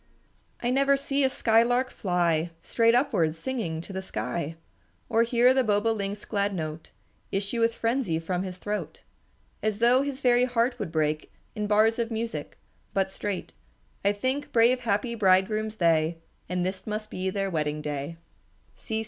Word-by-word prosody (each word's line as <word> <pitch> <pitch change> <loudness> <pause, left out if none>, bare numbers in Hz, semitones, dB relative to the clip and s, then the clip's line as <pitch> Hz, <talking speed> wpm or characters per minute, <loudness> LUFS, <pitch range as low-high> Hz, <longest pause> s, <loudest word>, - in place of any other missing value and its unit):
I 240 - +1
never 275 +1 +3
see 275 0 0
a 265 - +4
skylark 245 +2 +2
fly 175 -3 +1
Straight 230 0 +3
upward, 210 - +2
singing, 170 -5 -3
to 195 - -9
the 190 - -3
sky, 170 -3 -3 0.5
Or 225 - +3
hear 240 +2 +4
the 260 0 +3
bobolink's 205 -2 0
glad 200 -2 -1
note 160 -1 -5 0.4
Issue 200 +4 -1
with 230 0 +2
frenzy 230 -7 0
from 175 +2 -2
his 185 -1 -5
throat, 210 +2 -4 0.6
As 215 -1 0
though 240 +3 +5
his 280 -1 -4
very 245 -1 +4
heart 245 0 0
would 195 -6 -4
break 155 -1 -1 0.2
In 210 -2 -2
bars 220 +2 +3
of 230 -1 0
music, 230 0 -4 0.4
but 190 -1 +1
straight 200 -1 -4 0.5
I 200 - +4
think, 260 +8 -2
brave, 235 +2 +4
happy 235 0 0
bridegrooms 215 +1 +2
they, 165 -2 +2 0.3
And 180 0 0
this 190 +2 -4
must 215 0 -4
be 185 +1 -2
their 195 0 -2
wedding 150 -2 -1
day. 145 +2 -4
210 Hz, 155 wpm, -27 LUFS, 180-235 Hz, 0.6 s, though